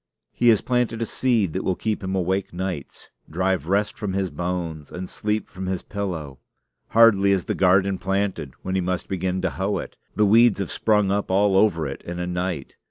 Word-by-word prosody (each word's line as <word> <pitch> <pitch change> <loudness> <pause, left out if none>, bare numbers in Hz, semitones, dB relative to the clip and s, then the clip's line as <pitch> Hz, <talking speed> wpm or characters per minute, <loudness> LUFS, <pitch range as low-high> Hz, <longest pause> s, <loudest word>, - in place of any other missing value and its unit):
He 120 - +3
has 110 -3 +5
planted 125 -2 0
a - - -1
seed 110 -8 +1
that 95 - -2
will 95 - 0
keep 110 0 -2
him 95 0 -2
awake 95 +1 -1
nights, 90 -5 -6 0.2
drive 95 0 0
rest 100 +3 +1
from 100 -3 -4
his 95 -1 -1
bones, 85 -4 -4
and 90 +1 -6
sleep 105 +2 -2
from 95 0 -7
his 95 -1 -2
pillow. 85 -10 -5 0.5
Hardly 105 -4 +5
is 95 -3 0
the - - -1
garden 95 +1 +3
planted, 95 -7 -2
when 95 - -3
he 95 - +1
must 90 0 -2
begin 95 -1 -2
to 95 - 0
hoe 95 +2 -1
it. - - -7 0.2
The 105 - +3
weeds 115 +2 +5
have 100 -3 -3
sprung 105 -3 +2
up 100 0 -1
all 100 +1 +3
over 95 -6 +3
it 70 -1 -5
in 90 0 -6
a 90 - -2
night. 90 -5 -3
95 Hz, 205 wpm, -23 LUFS, 90-100 Hz, 0.5 s, has